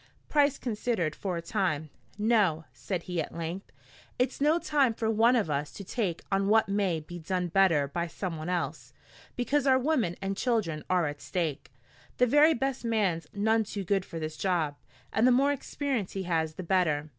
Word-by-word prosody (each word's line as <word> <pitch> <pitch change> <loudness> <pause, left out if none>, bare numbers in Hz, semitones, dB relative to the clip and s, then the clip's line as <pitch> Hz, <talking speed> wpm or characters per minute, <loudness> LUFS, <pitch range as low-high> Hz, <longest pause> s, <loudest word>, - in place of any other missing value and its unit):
Price 290 -2 +3
considered 215 - -1
for 185 -3 -3
a 170 - -5
time. 165 -6 -1 0.3
"No," 205 -8 +2
said 180 -4 -4
he 180 -2 -2
at 155 - -7
length. 170 +4 -5 0.5
"It's 250 +2 -1
no 305 +3 +4
time 280 -8 +2
for 220 -1 0
one 230 +3 +4
of 225 -8 +1
us 145 0 -2
to 200 - -8
take 190 -4 -2
on 195 0 +2
what 220 +1 +4
may 195 -4 0
be 175 +3 -9
done 180 +1 -2
better 170 -6 +3
by 170 +4 -2
someone 165 -2 -5
else, 180 -1 -3 0.4
because 275 +3 0
our 260 -1 +6
women 255 - +1
and 195 0 -2
children 195 - -1
are 180 -2 +3
at 145 0 -5
stake. 150 0 -3 0.5
The 250 - +5
very 295 +6 +5
best 270 0 -2
man's 205 -8 0
none 220 +2 +2
too 205 -1 -5
good 195 +1 +1
for 170 - -8
this 155 -1 -5
job, 170 -6 0 0.4
and 220 +4 +4
the - - +6
more 275 +3 +4
experience 275 -6 -3
he 195 - -3
has 160 -3 -1
the 185 - -6
better. 160 -5 +1
195 Hz, 190 wpm, -29 LUFS, 165-230 Hz, 0.5 s, our